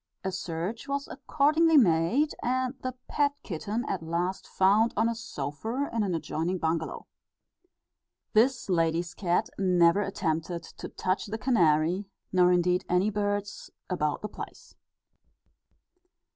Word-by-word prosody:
A 190 - -1
search 180 - -4
was 280 0 -2
accordingly 310 +2 +3
made, 220 - +3
and 255 +1 0
the 255 -1 -4
pet 285 -1 +1
kitten 210 - -3
at 190 - -2
last 170 +3 -2
found 205 +5 +3
on 225 +2 +3
a 230 - 0
sofa, 225 - -4
in 230 - +1
an 190 -4 0
adjoining 165 +2 -2
bungalo. 160 -1 -2 1.3
This 240 +5 +3
lady's 165 -1 +1
cat 175 -3 0
never 180 0 +4
attempted 170 -3 -2
to - - -9
touch 185 +3 -2
the 215 +2 -4
canary, 180 - +2 0.3
nor 180 -1 +5
indeed 180 0 +2
any 180 +4 +2
birds 205 0 -2 0.2
about 150 -3 -1
the - - -1
place. - - -10
190 Hz, 130 wpm, -28 LUFS, 170-230 Hz, 1.3 s, nor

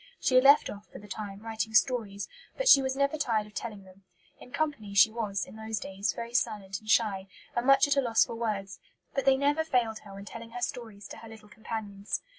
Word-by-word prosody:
She - - 0
had 255 0 +6
left 280 +2 +7
off, 205 0 -9
for - - -12
the 205 +2 -12
time, 200 0 -7
writing 220 -1 -3
stories, 215 -5 +1 0.3
but - - -1
she 275 - +9
was 265 0 -2
never 280 +2 0
tired 225 -7 0
of 210 - -16
telling 210 -4 -6
them. 190 +1 -18 0.4
In - - -13
company 265 -11 -3
she 200 +2 +7
was, 210 -4 -2
in - - -13
those 220 -1 -4
days, 195 +2 -2
very 235 0 -7
silent 205 -5 -1
and 215 - -14
shy, 200 -4 +2 0.3
and 240 +2 -1
much 275 +1 +6
at 285 - +1
a - - +5
loss 230 -3 +3
for - - -7
words; 205 -5 -3 0.3
but 275 - -1
they 270 -1 +5
never 290 +3 +1
failed 240 -7 0
her 200 -2 -13
when 200 0 -9
telling 230 +2 -9
her 245 - -6
stories 215 -4 -5
to - - -9
her 225 - -12
little 220 -1 -14
companions. 210 -2 -5
220 Hz, 230 wpm, -29 LUFS, 205-250 Hz, 0.4 s, she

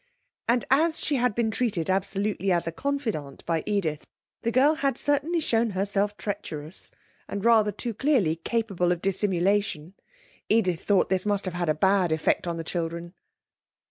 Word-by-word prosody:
And 240 +1 +2
as 315 +4 +3
she 290 - 0
had 245 -4 +1
been 230 -2 +1
treated 210 -8 -1
absolutely 195 +1 0
as 175 -1 +2
a 165 - -2
confidante 220 - -3
by 165 -1 0
Edith, 180 -8 -1 0.3
the 230 - 0
girl 270 +5 +5
had 275 -5 0
certainly 290 +5 +1
shown 230 -6 +1
herself 205 +1 0
treacherous, 160 -5 -5 0.4
and 200 +1 -4
rather 220 -3 +5
too 230 +4 -4
clearly 215 - +2
capable 195 -2 0
of 175 - 0
dissimulation. 190 -3 0 0.6
Edith 185 -7 +2
thought 200 -2 +3
this 190 +1 +1
must 205 -1 +1
have 175 -2 -2
a 155 - +2
bad 190 0 +3
effect 160 +2 +1
on 170 -1 -2
the 165 - -4
children. 170 +1 -4
200 Hz, 160 wpm, -26 LUFS, 175-230 Hz, 0.6 s, girl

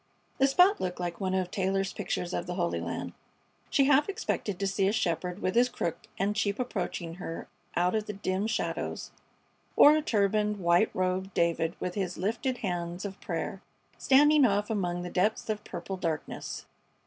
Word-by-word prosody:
The 270 - +5
spot 360 +9 +5
looked 180 -1 -3
like 175 +1 -4
one 190 -1 0
of 185 -1 -1
Taylor's 195 0 0
pictures 180 0 -3
of 175 - -2
the 175 - -3
Holy 175 -2 0
Land. - - -4 0.6
She 275 - +4
half 290 +5 +4
expected 210 - -2
to 200 - -1
see 195 0 +1
a - - +3
shepherd 180 -2 -1
with 185 - +1
his 245 +1 +4
crook 170 -8 -4
and 200 +2 0
sheep 200 -1 0
approaching 180 -8 -3
her 165 - -5 0.3
out 180 +1 +2
of 215 -1 -1
the 210 - -3
dim 195 +1 -1
shadows, 225 - -3 0.6
or 295 +1 +8
a 310 - +2
turbaned, 210 -4 +1
white 175 +2 +3
robed 185 +1 -1
David 170 0 +1
with 180 - -3
his 185 -3 -3
lifted 235 +7 -1
hands 175 +1 -3
of 195 -1 -7
prayer - - -4 0.4
standing 295 +2 +6
off 205 -2 +2
among 175 -4 -1
the 180 - -6
depths 210 +4 +1
of 210 -1 -4
purple 190 +1 -6
darkness. 165 -4 -4
195 Hz, 180 wpm, -29 LUFS, 180-215 Hz, 0.6 s, or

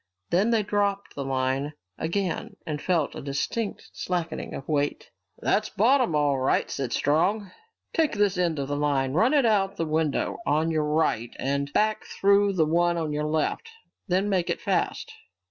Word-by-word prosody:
Then 195 +6 +3
they 225 -2 +2
dropped 200 -1 -1
the 140 - -4
line 135 +2 -1 0.3
again 180 +2 -2
and 150 -2 -4
felt 170 -5 0
a - - -7
distinct 140 +10 -3
slackening 170 -3 -3
of 135 - -8
weight. 145 -2 -1 0.3
"That's 215 0 +1
bottom 235 - +3
all 145 -2 +2
right," 130 - +1
said 135 -4 -3
Strong. 180 - +1 0.4
"Take 320 -3 +2
this 205 -2 +2
end 175 -3 0
of 140 -1 -2
the 145 - -2
line, 140 -3 +1
run 230 - +3
it 280 -4 +4
out 195 -3 +2
of - - -24
the 165 - 0
window 155 -1 0
on 155 0 +1
your 155 -1 +1
right, 150 -7 0
and 140 +1 -1
back 215 +5 +1
through 200 0 +3
the 165 -4 +3
one 170 +2 +2
on 160 -2 -2
your 150 +1 -1
left. 155 - -1 0.4
Then 190 +3 +1
make 185 -4 0
it - - -1
fast." - - -1
165 Hz, 180 wpm, -26 LUFS, 145-200 Hz, 0.4 s, it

